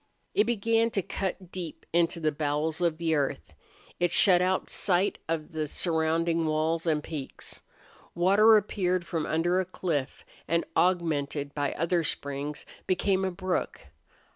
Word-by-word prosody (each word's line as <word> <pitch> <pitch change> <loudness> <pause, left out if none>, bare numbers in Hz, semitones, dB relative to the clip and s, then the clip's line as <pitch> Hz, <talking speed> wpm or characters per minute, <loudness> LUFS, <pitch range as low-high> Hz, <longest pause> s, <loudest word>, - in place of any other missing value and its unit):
It 210 - +3
began 230 0 +2
to 195 - +2
cut 185 -1 -4
deep 175 -4 -7
into 170 0 +2
the 155 -1 +1
bowels 150 +2 -1
of 170 -2 +1
the 165 -1 0
earth. 135 - -1 0.5
It 175 -1 +2
shut 180 -2 +5
out 185 +1 +1
sight 190 +1 +1
of 160 -2 -2
the 155 -1 -2
surrounding 165 +1 +1
walls 160 +2 0
and 150 -2 +1
peaks. 150 -5 -6 0.5
Water 200 +5 +6
appeared 185 -3 0
from 165 -3 -2
under 175 +3 +1
a - - +2
cliff 160 -7 -3 0.2
and, 170 +2 +1
augmented 150 -5 +1
by 145 -1 -1
other 170 +2 0
springs, 145 0 -3 0.2
became 190 +1 +1
a 190 - +1
brook. 185 0 -2
170 Hz, 145 wpm, -28 LUFS, 155-185 Hz, 0.5 s, Water